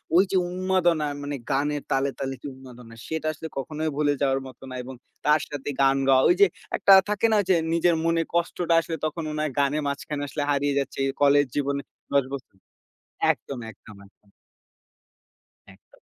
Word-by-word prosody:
ওই 185 - +7
যে, 190 - +3
উন্মাদনা 180 -4 +1 0.2
মানে 145 0 -3 0.2
গানের 145 +1 0
তালে, 135 +1 +2
তালে 135 -1 -2
যে, - - -6
উন্মাদনা। 125 -3 -13
সেটা 160 -1 -3
আসলে 160 +1 -7
কখনোই 155 +3 -2
ভুলে 145 -1 +2
যাওয়ার 135 -1 +2
মতো 130 - -14
না 130 - -7
এবং 130 +2 -8 0.3
তার 150 0 +4
সাথে 145 -1 -5
গান 135 0 +4
গাওয়া। 130 -1 +5
ঐ - - +3
যে, 200 - +9 0.3
একটা 195 - +6 0.2
থাকে 210 +2 +2
না? 215 - +4
যে, 185 - +6 0.2
নিজের 170 0 +3
মনে 165 0 +2
কষ্টটা 170 0 0
আসলে 165 0 -5
তখন 155 +1 -3
মনে 150 0 -3
হয় 155 - -1
গানের 145 +2 +1
মাঝখানে 145 +1 -3
আসলে 145 - -2
হারিয়ে 140 0 +1
যাচ্ছে 140 0 -4 0.2
কলেজ 145 0 +5
জীবনে 140 -1 0 0.3
১০ 140 -1 +4
বছর 130 -7 -8 0.8
একদম, 140 - -8
একদম, 105 0 -15
একদম। 100 0 -28 1.4
একদম। 100 - -26
145 Hz, 175 wpm, -25 LUFS, 135-160 Hz, 1.4 s, যে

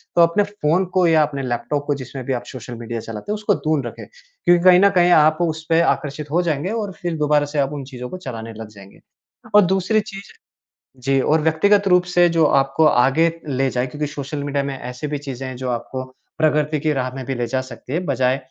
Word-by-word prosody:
तो 175 - +5
अपने 170 +5 +4
फ़ोन 190 -3 0
को 185 -1 +3
या 160 -1 +4
अपने 145 -2 -3
लैपटॉप 130 +4 -2
को 145 - +1
जिसमें 130 0 -7
भी 135 - -1
आप 120 -1 -3
सोशल 125 -1 -8
मीडिया 115 0 -5
चलाते 110 - -7
हैं - - +1
उसको 210 -1 0
दूर 155 -7 -1
रखें। - - -9
क्योंकि 485 - -1
कहीं 180 -1 +7
न 200 +1 +6
कहीं 175 -1 +5
आप 155 -1 +5
उसपे 160 -1 0
आकर्षित 150 -2 -1
हो 170 +3 +2
जाएँगे 165 0 -1
और 215 -3 -3
फिर 175 -3 -2
दोबारा 150 -1 +2
से 145 +1 -3
आप 140 0 +1
उन 145 -2 -5
चीज़ों 125 -1 -7
को 185 - -6
चलाने 115 -9 -7
लग 110 0 -8
जाएँगे। 100 -2 -15 0.6
और 210 - +9
दूसरी 190 +4 +1
चीज़ 200 -2 -8 0.7
जी, 135 +2 +1
और 155 +4 +2
व्यक्तिगत 195 +6 +3
रूप 180 -1 +4
से 175 0 +6
जो 165 -1 +3
आपको 135 +2 +2
आगे 150 +4 +3 0.2
ले 135 -1 0
जाए 125 0 -1
क्योंकि 150 +3 -4
सोशल 145 0 -5
मीडिया 140 -1 -1
में 140 -1 -4
ऐसी 125 +4 -6
भी 150 0 -3
चीज़ें 135 -2 -6
हैं 130 - -6
जो 130 0 -4
आपको 125 +2 -4 0.3
प्रगति 150 -1 +1
की 155 +1 0
राह 130 -2 -2
में 135 -1 -6
भी 135 - -3
ले 120 -1 -2
जा 130 +3 -1
सकती 130 0 -9
है 165 - +1
बजाए 130 -3 +1
150 Hz, 230 wpm, -20 LUFS, 130-170 Hz, 0.7 s, और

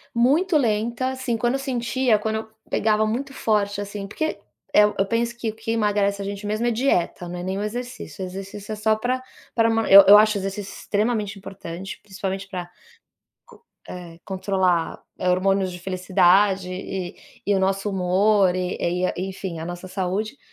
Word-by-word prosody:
Muito 305 +9 +3
lenta, 235 0 0
assim, 260 -3 -2
quando 240 +2 +1
eu 275 - 0
sentia, 255 -2 +1
quando 220 +1 -2
eu 220 0 -6 0.2
pegava 215 0 +2
muito 255 +6 -2
forte, 205 -4 0
assim, 200 0 -5
porque, 315 +10 -3 0.3
eh, 210 - +7
eu 210 -2 +2
penso 235 +3 -1
que 235 -2 -2
o - - -18
que 225 0 -4
emagrece 205 -2 +1
a - - -4
gente 200 +1 -5
mesmo 215 +3 -1
é 240 - +2
dieta, 220 -7 0
não 180 - -5
é - - -5
nem 190 +1 -2
o - - -2
exercício. 240 -2 -5
O - - -3
exercício 195 +3 -8
é - - -2
só 215 +1 +2
pra 250 +4 -1 0.3
pra 230 -1 +3
man 225 0 +1
eu 200 +1 +10
acho 215 0 +4
o - - -3
exercício 195 +1 -4
extremamente 210 -1 -1
importante 190 -1 -8
principalmente 195 -1 -5
pra 180 -2 -5 1.2
con - - -8
eh, 170 -2 -10
controlar 190 -3 0 0.2
hormônios 185 +1 +2
de 180 - -8
felicidade 185 +1 +3
e 185 -1 -5 0.3
e 205 - +2
o - - +2
nosso 195 +2 0
humor 190 0 +3
e 185 0 -2
e 180 +1 0 0.2
enfim 185 -3 -6
a 160 - -5
nossa 175 +2 -6
saúde, 195 +6 -2
205 Hz, 180 wpm, -23 LUFS, 190-225 Hz, 1.2 s, eu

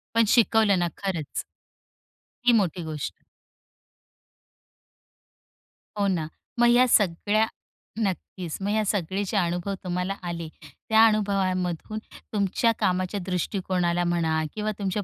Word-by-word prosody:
पण 230 0 +5
शिकवलं 220 -4 +4
ना 175 - +1
खरंच. 175 -7 -3 1.0
ही 245 - +6
मोठी 185 -5 +1
गोष्ट. 150 - -4 2.9
हो 200 - +2
ना. 170 -5 0 0.3
मग 240 - +6
ह्या 245 +1 +6
सगळ्या 205 +1 +3 0.5
नक्कीच, 185 -4 -3
मग 195 - -1
ह्या 215 0 +2
सगळे 195 0 -1
जे 210 - -1
अनुभव 175 +1 0
तुम्हाला 180 +1 -2
आले 170 -1 -4 0.2
त्या 220 - +3
अनुभवामधून 195 -2 0 0.3
तुमच्या 205 +3 +2
कामाच्या 185 +2 0
दृष्टिकोनाला 180 -1 0
म्हणा 165 -2 +1
किंवा 215 0 -2
तुमच्या 200 +1 -1
190 Hz, 110 wpm, -26 LUFS, 175-210 Hz, 2.9 s, ही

